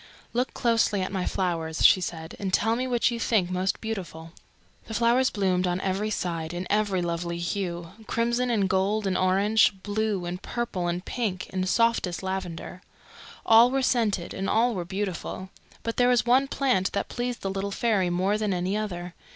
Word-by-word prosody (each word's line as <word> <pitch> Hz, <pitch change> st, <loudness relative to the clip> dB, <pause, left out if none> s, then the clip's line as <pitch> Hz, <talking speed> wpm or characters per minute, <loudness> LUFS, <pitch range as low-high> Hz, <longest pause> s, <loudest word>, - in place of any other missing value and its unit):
"Look 250 Hz, +2 st, -1 dB
closely 225 Hz, -5 st, +2 dB
at 185 Hz, -, -4 dB
my 190 Hz, -2 st, -2 dB
flowers," 165 Hz, -4 st, -1 dB
she 185 Hz, -, +7 dB
said, 160 Hz, -2 st, -5 dB
"and 195 Hz, -2 st, -2 dB
tell 225 Hz, +4 st, +2 dB
me 255 Hz, +2 st, -2 dB
which 245 Hz, -1 st, +2 dB
you 235 Hz, -, -3 dB
think 200 Hz, -6 st, +1 dB
most 185 Hz, +1 st, 0 dB
beautiful." 170 Hz, -7 st, -6 dB, 0.5 s
The 220 Hz, -, -6 dB
flowers 240 Hz, +3 st, +3 dB
bloomed 185 Hz, -3 st, +1 dB
on 175 Hz, 0 st, 0 dB
every 195 Hz, +3 st, -1 dB
side, 170 Hz, -5 st, -3 dB
in 180 Hz, +1 st, -3 dB
every 205 Hz, -3 st, +1 dB
lovely 170 Hz, 0 st, -2 dB
hue 170 Hz, -1 st, -3 dB, 0.2 s
crimson 235 Hz, +2 st, 0 dB
and 210 Hz, -5 st, +2 dB
gold 195 Hz, +3 st, +1 dB
and 190 Hz, -1 st, 0 dB
orange, 195 Hz, +1 st, +3 dB
blue 205 Hz, -3 st, -1 dB
and 175 Hz, +1 st, -5 dB
purple 215 Hz, -7 st, -3 dB
and 175 Hz, +2 st, -2 dB
pink 200 Hz, -7 st, -3 dB
and 185 Hz, 0 st, -1 dB
softest 225 Hz, -4 st, +1 dB
lavender. 185 Hz, -2 st, -5 dB, 0.6 s
All 225 Hz, +2 st, +7 dB
were 270 Hz, +1 st, 0 dB
scented, 215 Hz, -8 st, +1 dB
and 195 Hz, -, -3 dB
all 235 Hz, +2 st, +3 dB
were 180 Hz, -4 st, -3 dB
beautiful; 190 Hz, 0 st, -4 dB, 0.3 s
but 230 Hz, -, -3 dB
there 245 Hz, 0 st, +4 dB
was 245 Hz, -2 st, +3 dB
one 255 Hz, +3 st, +4 dB
plant 255 Hz, -9 st, +1 dB
that 200 Hz, -, -1 dB
pleased 245 Hz, 0 st, -3 dB
the 195 Hz, -, -1 dB
little 195 Hz, +1 st, -2 dB
fairy 200 Hz, -3 st, +1 dB
more 190 Hz, +4 st, +1 dB
than 210 Hz, -3 st, 0 dB
any 180 Hz, +3 st, -1 dB
other. 180 Hz, -5 st, -4 dB
195 Hz, 185 wpm, -26 LUFS, 180-225 Hz, 0.6 s, she